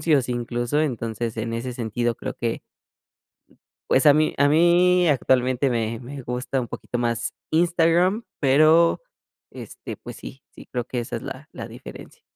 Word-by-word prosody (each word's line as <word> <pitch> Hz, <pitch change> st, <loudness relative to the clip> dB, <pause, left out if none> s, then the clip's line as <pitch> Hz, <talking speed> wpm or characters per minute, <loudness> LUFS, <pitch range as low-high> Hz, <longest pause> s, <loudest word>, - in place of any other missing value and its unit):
anuncios 150 Hz, -5 st, +2 dB
incluso, 120 Hz, +3 st, -1 dB
entonces, 115 Hz, -4 st, -3 dB
en 115 Hz, +1 st, -3 dB
ese 120 Hz, +2 st, -4 dB
sentido 120 Hz, 0 st, -2 dB
creo -, -, -5 dB
que 115 Hz, -1 st, -2 dB, 1.3 s
pues 130 Hz, -, +3 dB
a 145 Hz, -, +8 dB
mí 155 Hz, +1 st, +2 dB
a 145 Hz, -, +4 dB
mí 175 Hz, +3 st, +4 dB
actualmente 130 Hz, -2 st, +2 dB
me 115 Hz, -1 st, -1 dB
me 135 Hz, +3 st, -8 dB
gusta 125 Hz, +2 st, -2 dB
un 120 Hz, -, -5 dB
poquito 120 Hz, -, -5 dB
más 115 Hz, -1 st, -1 dB, 0.2 s
Instagram, 175 Hz, +5 st, +2 dB, 0.2 s
pero, 155 Hz, +4 st, +4 dB, 0.5 s
este, -, -, -9 dB
pues -, -, -10 dB
sí 135 Hz, -, -11 dB
sí -, -, -14 dB
creo 120 Hz, -2 st, -2 dB
que 125 Hz, 0 st, -3 dB
esa 120 Hz, -, -4 dB
es -, -, -6 dB
la -, -, -8 dB
la -, -, -7 dB
diferencia. -, -, -12 dB
130 Hz, 160 wpm, -23 LUFS, 120-155 Hz, 1.3 s, a